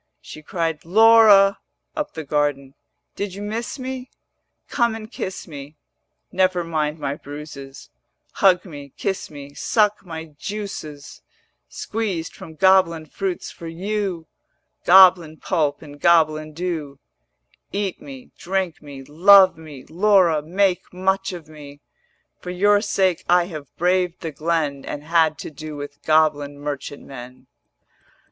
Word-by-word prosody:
She 155 - -11
cried 165 -1 -3
'Laura,' 210 0 +6 0.4
up 300 - -4
the 160 - -5
garden, 145 -2 -1 0.4
'Did 200 -2 -4
you 200 - -7
miss 225 +6 -4
me? 260 -1 -6 0.6
Come 235 -2 +1
and 220 0 -9
kiss 190 -5 -6
me. 145 -1 -10 0.5
Never 185 -1 +1
mind 155 -2 -2
my 145 -2 -3
bruises, 145 - -10 0.4
Hug 185 -1 +3
me, 145 -6 -10
kiss 190 -1 -3
me, 145 -1 -11
suck 210 +5 +1
my 160 -3 -7
juices 195 -9 -7 0.5
Squeezed 200 -7 -4
from 160 - -12
goblin 170 -2 +3
fruits 190 +2 -4
for 170 - -10
you, 185 0 -3 0.6
Goblin 175 -3 +6
pulp 155 -4 -1
and 145 -1 -13
goblin 155 -2 +3
dew. 160 -5 -4 0.7
470 - - -4
Eat 200 -3 -3
me, 135 -3 -11
drink 185 -2 -2
me, 140 -2 -10
love 185 +6 +6
me; 150 -5 -12
Laura, 180 -3 +3
make 185 +3 0
much 190 +2 -1
of 170 -4 -9
me: 145 -2 -12 0.6
For 180 - -8
your 205 +3 +3
sake 190 -4 0
I 175 0 +4
have 155 -6 -8
braved 180 0 0
the 165 - -4
glen 155 -2 -2
And 145 - -6
had 160 -1 +2
to - - -8
do 155 +1 -8
with 145 0 -8
goblin 150 -2 +2
merchant 145 -1 -6
men.' 125 -1 -11
165 Hz, 135 wpm, -22 LUFS, 150-190 Hz, 0.7 s, Laura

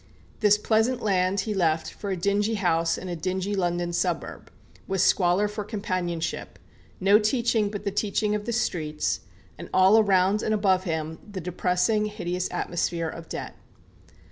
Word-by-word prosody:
This 210 -1 +5
pleasant 220 +4 +1
land 190 -1 +1
he 215 +1 -3
left 165 -4 0
for 200 - -6
a 190 - -1
dingy 205 +4 +1
house 165 -4 +1
in 185 - -7
a 175 - -3
dingy 185 +4 -2
London 175 -2 -1
suburb, 175 0 -2 0.4
with 190 0 -1
squalor 185 +2 +3
for 210 0 -5
companionship, 185 -5 -3 0.4
no 200 +2 +5
teaching 225 -1 +1
but 205 -1 -6
the 200 - -1
teaching 210 +1 0
of 210 0 -2
the 235 - -2
streets, 160 -10 -1 0.4
and - - -8
all 190 +4 +6
around 195 0 +3
and 215 - +1
above 190 -2 +2
him 160 -1 -3
the 195 - -5
depressing 180 +5 0
hideous 180 -3 -3
atmosphere 170 -1 -2
of 165 0 -9
debt. - - -6
190 Hz, 160 wpm, -26 LUFS, 175-210 Hz, 0.4 s, all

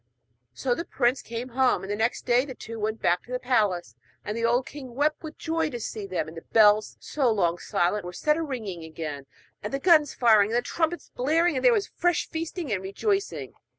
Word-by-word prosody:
So 250 - 0
the 335 - -3
prince 255 -5 +1
came 235 +2 -6
home; 255 -2 +2
and 195 - -5
the - - 0
next 225 +3 -1
day 245 0 +4
they 265 -2 -8
two 225 0 -8
went 215 +1 -3
back 175 - +3
to 245 - -15
the 250 - 0
palace, 210 - 0 0.3
and 210 - -3
the 230 - -3
old 240 +2 +2
king 260 -4 -9
wept 295 +3 +1
with 315 -1 -8
joy 325 -1 -1
to 240 -4 -5
see 215 -2 -5
them. 185 -4 -2
And 160 - -10
the 165 - -7
bells, 215 0 +4
so 275 -5 0
long 175 -5 +1
silent, 180 +4 0
were 180 - -6
set 300 - +1
a 330 - -2
ringing 220 - -5
again, 155 -3 -6 0.3
and 210 - -5
the 275 - 0
guns 305 -2 +4
firing, 215 -4 +5
and 230 - +1
the 240 - +1
trumpets 335 +5 -2
blaring, 320 +5 +2
and 260 - -1
there - - +7
was 425 -4 +2
fresh 350 -2 +1
feasting 325 - -4
and 190 - -1
rejoicing. 390 - -2
240 Hz, 225 wpm, -26 LUFS, 205-300 Hz, 0.3 s, there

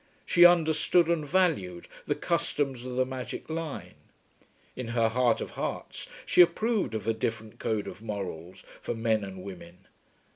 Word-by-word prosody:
She 175 -1 +6
understood 170 0 +4
and 160 -3 0
valued 140 - +1 0.2
the - - +1
customs 135 -4 -1
of 125 - -5
the 130 0 +2
magic 130 +4 -6
line. 160 -2 -5 0.8
In 125 -2 -5
her 115 -1 +4
heart 120 0 +2
of - - -5
hearts - - -5 0.2
she - - +6
approved 205 - +2
of 110 0 -4
a 115 - +3
different 110 -1 -4
code 110 -2 -1
of - - -8
morals 95 -5 -6 0.2
for - - -3
men 110 -2 +1
and 95 -2 -8
women. 90 -2 -11
120 Hz, 155 wpm, -28 LUFS, 105-160 Hz, 0.8 s, She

